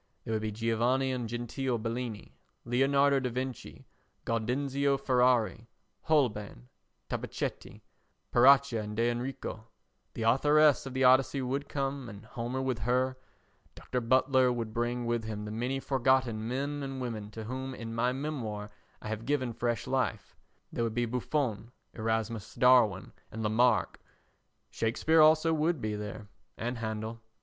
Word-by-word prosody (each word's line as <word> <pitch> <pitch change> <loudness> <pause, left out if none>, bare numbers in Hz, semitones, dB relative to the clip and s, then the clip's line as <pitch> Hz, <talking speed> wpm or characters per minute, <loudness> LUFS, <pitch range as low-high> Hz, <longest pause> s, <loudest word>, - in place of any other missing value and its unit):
There 110 - -3
would 110 - 0
be 110 0 -2
Giovanni 115 +4 +1
and 125 -3 -3
Gentile 120 +2 -2
Bellini, 115 -1 -5 0.3
Leonardo 140 +3 +3
da 130 -1 -2
Vinci, 130 0 -5 0.4
Gaudenzio 135 +5 0
Ferrari, 125 -3 +2 0.4
Holbein, 105 - 0 0.4
Tabachetti, - - -5 0.5
Paracca 135 -1 +6
and 105 0 -6
D'Enrico; 120 -1 -2 0.5
the 115 - -3
Authoress 145 +5 +4
of 130 - -7
the 130 - +1
Odyssey 130 +1 +4
would 135 +3 -3
come 135 -2 -3
and 105 0 -11
Homer 120 +3 -4
with 130 -3 -1
her; 125 +3 +1 0.6
Dr. 125 - -3
Butler 130 +1 +3
would 115 -3 -3
bring 120 +1 -1
with 120 -1 -1
him 105 -1 -5
the 105 - -6
many 125 +5 -2
forgotten 130 -4 +1
men 140 +4 -2
and 135 -1 -5
women 110 -5 -4
to 110 +1 -8
whom 130 +3 -5
in 115 -2 -6
my 120 +2 +1
memoir 120 -7 -4 0.3
I - - -6
have 110 +2 -5
given 130 -5 0
fresh 120 -1 -2
life; - - -2 0.4
there 115 - -1
would 115 -1 -2
be 120 0 +1
Buffon, 120 -1 -2 0.2
Erasmus 110 -1 -2
Darwin 120 -7 +4 0.2
and 110 +1 -5
Lamarck; 110 +2 +2 0.7
Shakespeare 155 +8 +2
also 155 +1 +5
would 160 0 +1
be 110 -2 -2
there 105 0 -6 0.3
and 120 +1 -3
Handel. 110 0 -4
120 Hz, 140 wpm, -30 LUFS, 115-135 Hz, 0.7 s, Paracca